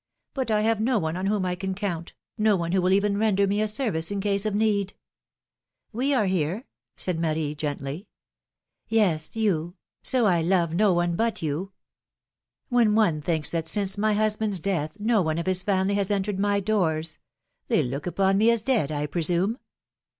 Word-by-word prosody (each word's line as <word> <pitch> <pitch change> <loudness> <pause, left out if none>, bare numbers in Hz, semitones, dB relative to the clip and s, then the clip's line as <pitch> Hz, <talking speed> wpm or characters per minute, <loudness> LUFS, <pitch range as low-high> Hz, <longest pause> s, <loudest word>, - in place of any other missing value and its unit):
But 265 -3 -2
I 210 -1 +2
have 225 0 +1
no 245 +2 +2
one 160 -4 -1
on 185 +2 -2
whom 200 -2 0
I 180 - 0
can 190 +1 -4
count, 175 -4 -4 0.2
no 215 -2 +3
one 170 -2 -2
who 190 0 +2
will 185 +1 +2
even 200 +1 +2
render 205 -2 +3
me 200 +2 0
a 215 - +1
service 210 -8 0
in 200 0 -2
case 200 +1 0
of 210 - -1
need! 205 -2 +1 1.0
We 260 +6 0
are 250 -7 +2
here 185 - -1 0.3
said 180 -3 -2
Marie, 155 -2 -1
gently. 145 +3 -5 0.8
^^Yes, 180 -8 +2
you 180 -6 0
I - - -57 0.2
so 255 -3 +2
I 175 -4 +3
love 170 -1 +1
no 205 +3 +3
one 175 -1 +1
but 225 -2 -1
you! 165 +6 -3 1.0
When 235 -4 +3
one 175 -9 +2
thinks 160 -1 -1
that 165 -1 -2
since 195 +2 0
my 215 +1 +1
husband's 215 -2 0
death, 170 0 -2
no 220 0 +2
one 160 -2 -1
of 170 - -2
his 185 -1 +3
family 190 0 +1
has 200 -1 0
entered 200 -1 -1
my 205 0 +2
doors! 165 -6 0 0.5
They - - +2
look 140 +6 -4
upon 195 +3 +2
me 220 +2 +5
as 235 -2 +2
dead, 225 - +1
I 145 -1 -1
presume." 175 - 0
195 Hz, 190 wpm, -25 LUFS, 170-210 Hz, 1.0 s, me